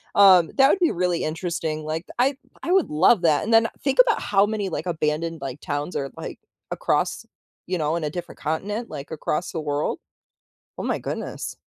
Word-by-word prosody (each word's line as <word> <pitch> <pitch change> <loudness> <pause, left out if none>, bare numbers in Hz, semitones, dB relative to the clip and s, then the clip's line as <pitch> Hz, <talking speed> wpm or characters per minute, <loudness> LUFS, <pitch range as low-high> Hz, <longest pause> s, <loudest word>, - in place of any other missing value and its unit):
um, 185 -4 +7
that 270 0 +7
would 390 - +3
be 345 -3 +3
really 175 -1 0
interesting, 160 -1 -3
like, 160 +2 -3
I 270 +2 +2 0.3
I 350 - -1
would 380 -3 +3
love 175 +6 +4
that. 155 -3 +3
And 225 +2 -1
then 225 0 +6 0.2
think 275 - 0
about 460 - +2
how 200 0 +3
many, 210 -2 -2
like, 175 - -4
abandoned, 160 0 -1
like, 135 +1 -6
towns 145 +3 -3
are, 135 -1 -2
like, - - -7 0.3
across - - 0 0.4
you 185 0 -1
know, 155 0 0
in 170 - -4
a 150 - -1
different 175 +3 -7
continent, 205 +9 -3
like, 145 -2 -8
across 160 +2 -2
the 165 - -3
world. 145 0 -1 0.8
Oh, - - -4
my - - -1
goodness. - - -5
170 Hz, 195 wpm, -24 LUFS, 155-205 Hz, 0.8 s, um